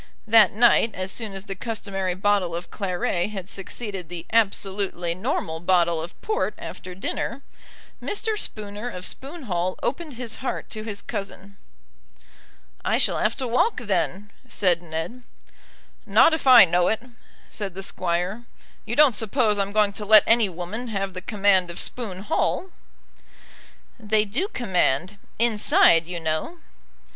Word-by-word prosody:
That 220 -3 +6
night, 230 0 +4
as 185 +1 -3
soon 220 -3 -3
as 195 0 -5
the 195 - -4
customary 195 -3 -3
bottle 195 -3 +1
of 175 +1 -7
claret 180 -1 -1
had 195 -4 -6
succeeded 195 -2 -7
the 175 -1 -7
absolutely 195 -5 0
normal 175 - -2
bottle 170 -2 +2
of 170 +2 -9
port 435 0 -1
after 180 0 -8
dinner, 235 +7 -4 0.6
Mr. 430 +1 -2
Spooner 210 - -4
of 180 -5 -7
Spoon 290 +4 -5
Hall 180 -4 -2
opened 305 -2 -3
his 235 -2 -5
heart 260 - -4
to 215 - -4
his 215 -2 -5
cousin. 200 0 -7 1.3
"I - - +2
shall - - +1
have - - +1
to 260 - -3
walk, 250 - +2
then," 205 -2 -2 0.2
said 180 -7 +2
Ned. 165 +9 -5 0.9
"Not 325 - +6
if 320 -4 -2
I 255 -6 +10
know 175 0 +2
it," 220 +1 0 0.5
said 195 -4 -5
the 195 - -5
Squire. 185 +5 -2 0.4
"You - - -3
don't 290 -4 +6
suppose 220 0 +1
I'm 200 0 0
going 210 -1 +2
to 210 - -6
let 215 +1 +7
any 230 -3 +4
woman 180 +8 -5
have 195 -3 -3
the 185 - -6
command 195 -3 +2
of 170 - -6
Spoon 200 -7 -2
Hall?" 355 - -1 1.3
"They 215 -1 +1
do 245 - -1
command, 190 - 0 0.2
inside, 210 -7 +4
you 175 -1 -4
know." 160 - -2
200 Hz, 150 wpm, -24 LUFS, 180-230 Hz, 1.3 s, I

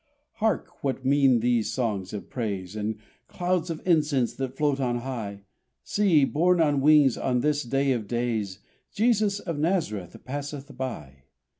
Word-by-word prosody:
Hark, 210 -5 -1
what 135 -1 -2
mean 135 -3 +4
these 120 -2 +1
songs 105 -7 -2
of 105 - -6
praise 100 -5 -4
And 110 0 -2 0.3
clouds 180 -1 -1
of 165 -2 -5
incense 150 -7 +2
that 135 0 -4
float 145 -2 +1
on 120 -2 0
high? 110 -6 -5 0.4
See! 180 -9 +3
borne 175 +5 +2
on 145 -4 +3
wings 145 -3 +5
on 125 -2 +1
this 150 +1 +1
day 135 +2 0
of 115 -5 -1
days, 115 -5 -2 0.3
Jesus 210 -2 +2
of 165 -6 -4
Nazareth 150 - -1
passeth 145 +1 -6
by! 70 - -6
135 Hz, 150 wpm, -26 LUFS, 115-155 Hz, 0.4 s, wings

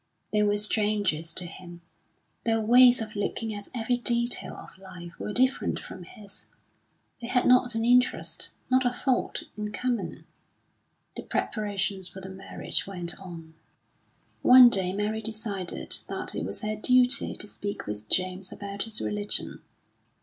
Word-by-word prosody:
They 210 - +3
were 205 0 +2
strangers 205 -6 +1
to 180 - +1
him; 175 0 -11 0.6
their 225 -1 +2
ways 245 +2 +6
of 215 -1 -10
looking 220 +2 -2
at 205 -1 -7
every 245 +1 0
detail 240 0 0
of - - -12
life 180 -3 -10
were - - -4
different 260 +4 +2
from 180 - -10
his; 205 +1 -10 0.7
they 235 - -5
had 250 0 +2
not 250 -1 +4
an 225 0 0
interest, 250 +1 +2 0.2
not 260 0 +3
a 245 - +3
thought, 250 +1 -1
in 210 0 -4
common.... 240 0 -3 0.9
The - - -5
preparations 200 -3 -1
for 190 - -9
the 190 0 -8
marriage 190 0 -4
went 175 -3 -2
on. 165 -4 -10 0.9
One 250 -1 +9
day 185 -3 +2
Mary 210 +3 -2
decided 210 -4 -2
that - - -4
it 80 - -3
was 100 +2 -5
her 215 0 -2
duty 250 +3 +3
to - - -3
speak 205 0 -6
with 105 +1 -6
James 185 0 -1
about 200 0 -6
his 225 -2 -4
religion. 210 0 -1
210 Hz, 150 wpm, -27 LUFS, 190-235 Hz, 0.9 s, One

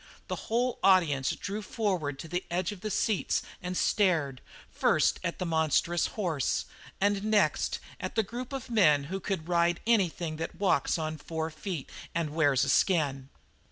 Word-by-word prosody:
The - - -1
whole 245 +2 +1
audience 150 -9 +4
drew 205 +2 -4
forward 185 - -2
to 165 - -8
the 175 +2 -2
edge 175 +2 -1
of 200 -3 -9
the 215 - -3
seats 210 -1 0 0.2
and 180 0 -3
stared, 160 - +1 0.3
first - - +2
at - - -2
the 185 - -3
monstrous 160 +1 +2
horse, 140 - 0 0.3
and 200 0 +1
next 215 -1 +2 0.2
at - - -5
the 220 - +3
group 240 +5 -6
of 270 -2 -5
men 155 -11 +5
who 195 - -1
could 190 -4 -3
"ride 170 -1 +2
anything 175 -8 +1
that 165 - -4
walks 185 -8 +2
on 155 -1 -3
four 160 +1 -4
feet 160 -2 -5 0.3
and 165 -3 -1
wears 145 -5 +3
a 140 - 0
skin." 140 -5 +2
175 Hz, 165 wpm, -29 LUFS, 155-200 Hz, 0.3 s, men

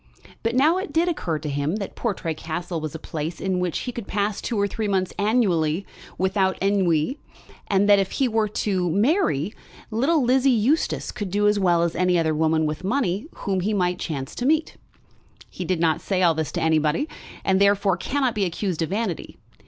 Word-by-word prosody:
But 230 +1 -1
now 310 +8 +4
it 375 - -5
did 325 +4 +2
occur 175 - -1
to 150 0 -6
him 145 +4 -1
that 205 -2 -5
Portray 190 -8 -2
Castle 165 +2 -4
was 155 0 -5
a - - -2
place 160 +1 -5
in 190 -1 -1
which 180 -2 -1
he 250 - -4
could 235 -4 -7
pass 205 0 -1
two 230 -4 -2
or 200 - +2
three 215 +1 -3
months 190 -2 0
annually 195 -6 +1 0.3
without 190 0 +1
ennui; 195 - +1 0.5
and 200 0 +2
that 205 -1 +6
if 195 -1 -1
he 270 - +2
were 220 -2 +1
to 190 -3 -1
marry, 200 - +1 0.4
little 275 +7 +2
Lizzie 260 +2 +3
Eustace 255 +6 +1
would 205 -3 -3
do 205 +2 +2
as 210 0 +3
well 175 -3 +3
as 170 - -1
any 180 0 +2
other 160 -2 +1
woman 160 0 +2
with 155 +3 -3
money 205 - 0 0.2
whom 195 -2 +1
he 210 +4 0
might 180 -2 0
chance 135 -5 -4
to 245 - -4
meet. 315 +1 +1 0.8
He 180 - -5
did 180 -1 0
not 160 -2 +2
say 185 -2 0
all 170 -2 +5
this 160 -1 -3
to - - -2
anybody, 160 - +2 0.4
and 190 0 +3
therefore 200 -1 +3
cannot 260 +6 -1
be 205 -2 0
accused 180 -1 -2
of 160 - -1
vanity. 200 -3 -3
190 Hz, 200 wpm, -24 LUFS, 165-220 Hz, 0.8 s, that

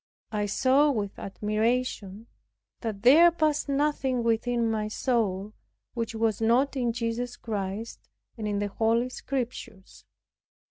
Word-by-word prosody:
I 210 -1 -1
saw 265 +7 +3
with 210 -7 -2
admiration 215 0 -2 0.5
that 215 -3 -5
there 310 +8 +8
passed 310 -3 0
nothing 275 -3 0
within 230 +1 +1
my 215 -1 -1
soul 215 -4 -1 0.4
which 230 -2 -3
was 225 -1 0
not 245 +6 +3
in 245 -3 0
Jesus 235 +1 -3
Christ 210 0 -5 0.3
and 220 -2 -4
in 205 -1 -1
the 205 0 -1
Holy 230 +4 +1
Scriptures. 245 -7 -6
230 Hz, 125 wpm, -27 LUFS, 215-255 Hz, 0.5 s, there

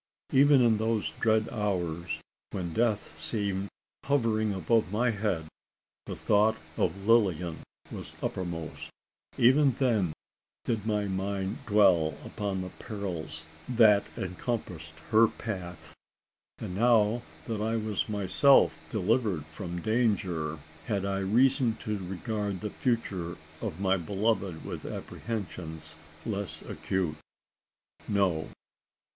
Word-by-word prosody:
Even 140 -1 +6
in 115 -2 +4
those 110 -1 0
dread 110 -1 +3
hours 90 -6 -2 0.3
when 90 -4 -4
death 110 -6 0
seemed 100 +2 +2 0.4
hovering 115 -6 +2
above 95 +2 +1
my 115 +3 +2
head, 100 -6 -1 0.6
the - - -4
thought 110 +2 +3 0.2
of 100 0 -1
Lilian 90 -8 +3 0.3
was - - -7
uppermost 85 -3 -4 0.5
even 135 +3 +5
then 110 - +1 0.5
did 110 -2 -1
my 105 -1 +1
mind 95 0 -2
dwell 95 -7 +4
upon 100 -2 -3
the 90 -1 -6
perils 85 -7 -4 0.2
that 110 -4 +6
encompassed 90 - -4 0.2
her 115 +1 +7
path. 90 -7 -6 0.6
And - - -5
now 115 +1 +4 0.2
that 110 -3 -3
I 110 +1 0
was 110 -1 -1
myself 105 - +5
delivered 105 - +1
from 85 +2 -6
danger, 95 -9 0 0.3
had 100 -1 0
I 100 0 -1
reason 120 +4 +3
to 105 -1 -3
regard 100 0 -3
the 105 - -3
future 95 -8 -1 0.2
of 80 - -4
my 95 -1 +2
beloved 95 -1 -1
with - - -5
apprehensions 80 -8 -5 0.3
less 100 -3 -1
acute? 90 -5 -2 0.9
No. 95 -6 +1
100 Hz, 115 wpm, -29 LUFS, 90-110 Hz, 0.9 s, her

